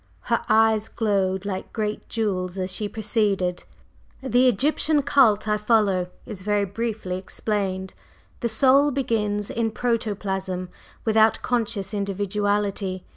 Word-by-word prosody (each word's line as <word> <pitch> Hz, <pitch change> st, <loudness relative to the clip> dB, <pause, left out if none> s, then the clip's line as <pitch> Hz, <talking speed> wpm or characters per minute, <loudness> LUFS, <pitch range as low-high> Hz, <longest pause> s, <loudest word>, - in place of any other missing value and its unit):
Her -, -, 0 dB
eyes 220 Hz, -1 st, +4 dB
glowed 195 Hz, -3 st, 0 dB
like 190 Hz, -2 st, -4 dB
great 215 Hz, -1 st, -3 dB
jewels 190 Hz, -5 st, -2 dB
as 185 Hz, 0 st, -2 dB
she 205 Hz, +2 st, -3 dB
proceeded: 205 Hz, -5 st, 0 dB, 0.6 s
"The 255 Hz, 0 st, +3 dB
Egyptian 290 Hz, +5 st, +2 dB
cult 220 Hz, -7 st, +4 dB
I 210 Hz, 0 st, +2 dB
follow 210 Hz, -4 st, +2 dB, 0.2 s
is 205 Hz, -4 st, -8 dB
very 205 Hz, +1 st, +1 dB
briefly 205 Hz, -2 st, -3 dB
explained. 190 Hz, -1 st, -3 dB, 0.5 s
The 235 Hz, -, -1 dB
Soul 275 Hz, +5 st, +4 dB
begins 215 Hz, -6 st, -1 dB
in 230 Hz, -1 st, 0 dB
protoplasm 195 Hz, -6 st, -2 dB, 0.4 s
without 220 Hz, 0 st, +3 dB
conscious 215 Hz, -5 st, -1 dB
individuality. 200 Hz, -1 st, -1 dB
210 Hz, 120 wpm, -24 LUFS, 195-225 Hz, 0.6 s, eyes